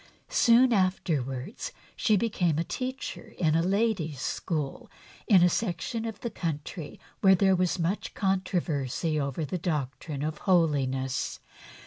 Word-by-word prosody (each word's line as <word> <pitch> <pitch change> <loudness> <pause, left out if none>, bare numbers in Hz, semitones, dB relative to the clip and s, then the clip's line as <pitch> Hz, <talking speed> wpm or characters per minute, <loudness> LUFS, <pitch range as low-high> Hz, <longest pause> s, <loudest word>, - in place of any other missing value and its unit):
Soon 245 +1 +5
afterwards 175 - -1 0.2
she 215 -2 +3
became 180 -8 +1
a 165 - +1
teacher 255 +1 -5
in 160 -4 +2
a 165 - +3
ladies' 190 - 0
school 155 - -3 0.4
in 190 -5 +6
a - - +7
section 220 +4 -2
of 225 -2 -6
the 235 - -3
country 160 -1 -5 0.2
where 190 -1 +6
there 190 +1 +4
was 180 0 +1
much 175 +4 -2
controversy 165 - 0
over 140 +2 -2
the 180 +5 -3
doctrine 150 -3 -3
of 155 0 -3
holiness. 135 -8 +1
175 Hz, 130 wpm, -28 LUFS, 150-200 Hz, 0.4 s, a